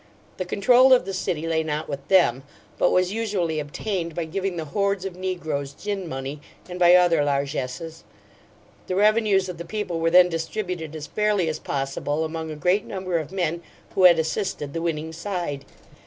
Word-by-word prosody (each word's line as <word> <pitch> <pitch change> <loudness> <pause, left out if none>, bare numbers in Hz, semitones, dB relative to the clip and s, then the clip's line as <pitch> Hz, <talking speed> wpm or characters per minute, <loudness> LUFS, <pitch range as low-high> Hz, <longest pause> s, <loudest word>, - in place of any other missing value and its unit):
The 185 - -3
control 245 +8 +5
of 250 - +4
the 195 - -4
city 170 -4 -2
lay 165 -1 +1
not 155 -1 -3
with 140 -1 -6
them, 175 -10 +4 0.4
but - - +4
was 185 +1 +2
usually 195 -8 -1
obtained 170 +3 -4
by 170 - -2
giving 190 +2 -3
the 160 - -3
hordes 200 +4 -1
of 190 -2 -5
negroes 160 -7 -3
gin 200 +2 -4
money, 135 +2 -5 0.3
and 180 0 -7
by 175 0 +7
other 175 -4 +4
largesses. 140 +3 -3 0.8
The 185 - -2
revenues 210 -1 +3
of 180 -2 -7
the - - -4
people 180 -2 -3
were 165 0 +2
then 180 +1 +7
distributed 165 -1 -4
as 155 -1 -6
fairly 210 +1 +1
as 155 - -3
possible 140 +3 -2
among 160 0 -5
a 155 - -5
great 180 +7 +1
number 185 -3 -2
of 155 -1 -7
men 170 -3 -1 0.3
who 185 - +4
had 175 -2 +8
assisted 160 -3 -2
the 165 - -3
winning 160 -1 -3
side. 170 -6 -4
170 Hz, 185 wpm, -24 LUFS, 155-190 Hz, 0.8 s, had